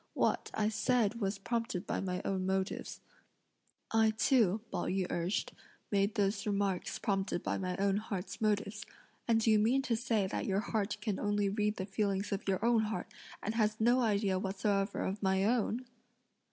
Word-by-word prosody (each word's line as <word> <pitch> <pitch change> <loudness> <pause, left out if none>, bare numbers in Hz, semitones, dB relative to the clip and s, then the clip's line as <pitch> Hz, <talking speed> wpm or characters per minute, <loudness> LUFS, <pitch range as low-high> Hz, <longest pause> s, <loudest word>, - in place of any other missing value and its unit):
What - - +1
(I 215 0 +2
said) 230 0 +1
was 195 0 0
prompted 225 -2 -2
by - - -1
my 180 -1 -3
own 190 -1 0
motives." 190 0 -2 0.9
"I 225 0 +4
too," 220 -2 +3
Pao - - -2
yü 190 0 0
urged, 175 +4 -1 0.4
"made 200 0 +2
those 200 +1 0
remarks 200 -2 0
prompted 195 -3 -1
by - - -1
my 185 -1 -2
own 200 0 +2
heart's 205 -2 -5
motives, 210 -1 0 0.4
and 230 -1 +4
do 225 0 +3
you 215 - +5
mean 245 +6 +3
to 245 -4 +1
say 225 -3 +1
that 190 - -3
your 195 0 +1
heart 215 -2 -1
can 210 -2 -2
only 205 -1 +1
read 210 +1 0
the 190 - -3
feelings 200 0 -1
of 200 0 -3
your 195 +3 +1
own 230 -2 +4
heart, 220 0 -4 0.3
and 215 - -1
has 215 -1 +1
no 240 +3 +4
idea 200 -5 +1
whatsoever 195 +1 0
of 195 +2 -2
my 190 0 +2
own?" 235 +2 +1
205 Hz, 180 wpm, -33 LUFS, 195-220 Hz, 0.9 s, you